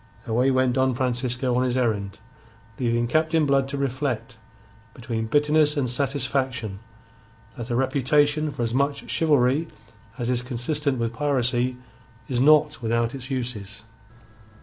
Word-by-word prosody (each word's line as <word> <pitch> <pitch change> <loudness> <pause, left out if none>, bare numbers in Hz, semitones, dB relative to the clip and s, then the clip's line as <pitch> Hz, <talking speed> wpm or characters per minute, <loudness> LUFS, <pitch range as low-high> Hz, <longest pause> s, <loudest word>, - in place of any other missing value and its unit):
Away 125 +4 +2
went 130 -1 +2
Don 130 -1 +1
Francisco 125 0 -1
on 125 - +2
his 130 0 0
errand, 105 -5 -1 0.6
leaving 120 -1 +1
Captain 155 +3 +2
Blood 135 -1 +2
to 140 - -4
reflect, 130 -4 -3 0.6
between 115 -2 -4
bitterness 150 +3 +3
and 135 -3 +1
satisfaction, 130 -4 -1 0.8
that 120 +1 -7
a 120 - 0
reputation 145 +4 +2
for 135 -4 -4
as 115 0 -2
much 140 +2 -1
chivalry 145 0 +2 0.5
as 120 -3 -3
is 125 -1 0
consistent 130 +3 -2
with 115 -1 -2
piracy 125 -2 0 0.5
is 125 -2 0
not 150 0 +4
without 115 0 0
its 135 -1 -7
uses. 110 -6 -4
130 Hz, 135 wpm, -24 LUFS, 120-140 Hz, 0.8 s, not